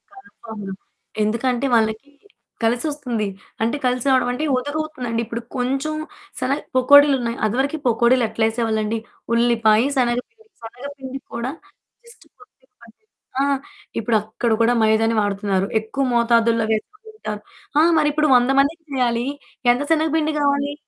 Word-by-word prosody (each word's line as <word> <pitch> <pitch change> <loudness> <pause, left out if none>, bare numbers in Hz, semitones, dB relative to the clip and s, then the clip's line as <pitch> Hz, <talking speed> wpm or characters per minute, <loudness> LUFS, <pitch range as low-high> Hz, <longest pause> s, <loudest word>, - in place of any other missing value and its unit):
కన్ఫర్మ్‌గా. 220 - -9 0.5
ఎందుకంటే 240 +4 0
వాళ్ళకి 220 +5 0 0.5
కలిసొస్తుంది. 240 -2 -1 0.4
అంటే 235 +5 0
కలిసి 250 +1 0
రావడం 255 -2 +3
అంటే 300 +5 -2
ఒదుగవుతుందండి. 275 -4 -3
ఇప్పుడు 235 +1 -5 0.2
కొంచెం 270 +5 -1 0.5
శన 260 +1 -1 0.2
పకోడీలున్నాయి. 265 -3 +5
అది 215 +2 0
వరకు 280 +4 0
పకోడీలు 235 +1 +3
ఎట్లా 220 0 0
యేసేవాళ్ళండి? 225 -1 -1 0.4
ఉల్లిపాయ 230 -1 +3
శనగపిండి. 255 - -2 0.2
శనగ 245 +4 -9
పిండి 265 0 -7
కూడా 235 +3 -3 0.5
జస్ట్ 470 - -18
కొద్దిగా 410 -10 -23
కొద్దిగా 265 - -7
ఆ - - +2 0.5
ఇప్పుడు 220 0 +2
అక్కడ 220 +2 -3
కూడా 240 +2 +3
మైదాని 220 +1 +3
వాడుతున్నారు. 200 -1 0
ఎక్కువ 270 +5 -3
మోతాదుల్లో 230 -1 +3
వేసుకుంటారు. 425 - -6 0.4
ఆ! - - +7 0.2
మరి 295 -1 +3
ఇప్పుడు 305 -1 +2
100 245 +2 +2
మందికి 320 +4 +1
చేయాలి. 240 -2 +1 0.5
ఎంత 250 - -3
శనగపిండి 315 -1 +2
గావాలి? 285 0 +1
245 Hz, 125 wpm, -21 LUFS, 225-285 Hz, 0.5 s, ఆ